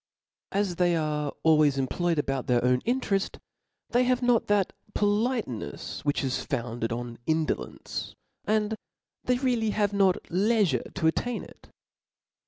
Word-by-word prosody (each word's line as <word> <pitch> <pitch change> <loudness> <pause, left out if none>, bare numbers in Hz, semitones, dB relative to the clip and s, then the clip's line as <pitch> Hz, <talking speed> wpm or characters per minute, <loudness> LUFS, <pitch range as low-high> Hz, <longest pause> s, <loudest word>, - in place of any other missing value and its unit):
As 195 -3 0
they 175 -1 +3
are 150 -2 -1
always 155 -3 +5
employed 165 +6 0
about 135 -3 -1
their 120 -1 +2
own 125 0 +3
intereft, 210 -6 0 0.5
they 245 +1 +4
have 250 0 +1
not 245 -2 +3
that 205 -2 +2 0.2
poHtencfs: 210 - -1
which 145 -1 0
is 130 -1 -1
founded 115 -1 -3
on 120 0 -5
indolence; 160 0 -2 0.3
and 215 0 +1 0.5
they 250 0 +2
really 245 -4 +1
have 205 -1 +1
not 195 -2 +4
Jeifure 190 - +1
to 175 - -1
attain 235 +9 0
it. - - -15
180 Hz, 135 wpm, -27 LUFS, 140-215 Hz, 0.5 s, always